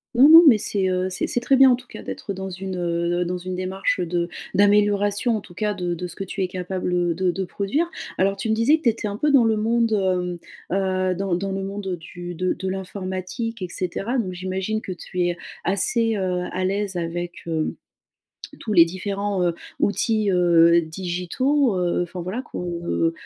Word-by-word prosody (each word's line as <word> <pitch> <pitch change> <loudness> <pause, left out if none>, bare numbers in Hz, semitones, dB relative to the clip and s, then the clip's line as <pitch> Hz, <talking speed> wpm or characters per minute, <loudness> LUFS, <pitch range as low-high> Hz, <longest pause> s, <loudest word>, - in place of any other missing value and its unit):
Non, 275 +5 +7
non, 330 +2 +11
mais 225 -7 +7
c'est, 195 -2 0
heu, 185 0 0
c'est 185 - -2
c'est 245 - 0
très 265 +3 +3
bien, 265 -1 +7
en - - +5
tout 245 0 -14
cas, - - -10
d'être 200 - -5
dans 190 0 -6
une, 190 0 -5
heu, 175 0 0
dans 180 +1 -3
une 185 +1 -5
démarche 185 +1 -1
de 175 0 -1 0.2
d'amélioration, 205 +2 +3
en - - -6
tout 175 -3 -16
cas, 210 0 -1
de 175 -2 -2
de 180 - -5
ce - - -9
que 195 - -4
tu 195 0 -3
es - - 0
capable, 180 0 -3
heu, 175 -1 +1
de 185 0 +1
de 190 +2 -3
produire. 245 - -1 0.3
Alors, 195 +1 +2
tu 225 - -3
me - - +3
disais 240 +8 +4
que 320 - -17
tu 235 - +5
étais 220 -1 -2
un 205 0 -4
peu 300 +3 +2
dans 265 -4 +6
le 220 -1 +2
monde, 230 +1 +1
hem, 180 -3 0 0.7
heu, - - -1
dans 195 -1 -2
dans 195 +2 -1
le 195 0 -3
monde, 195 0 -5
heu, 180 - -2
du 175 +1 -8
de 185 +2 0
de 190 - -5
l'informatique 190 +3 -4
et 180 - -4
cetera 195 +8 -2
donc, 185 -5 -2
j'imagine 190 +4 -3
que - - -6
tu 180 +1 -4
es 175 0 0 0.3
assez, 225 +4 +1
heu, 180 -2 -1
à 185 +1 -2
l'aise 195 0 -1
avec, 175 +1 -4
heu, 160 -1 -1 0.9
tous 215 - -4
les 170 -4 +7
différents, 195 +1 -2
heu, 170 -1 +1 0.2
outils, 215 0 +1
heu, 170 -1 +5
digitaux, 185 - 0
heu, 175 -1 0
enfin 175 +1 -7
voilà, 190 +8 -3
qu'on, 220 - -7 0.2
heu 165 -1 +1
190 Hz, 215 wpm, -23 LUFS, 180-210 Hz, 0.9 s, non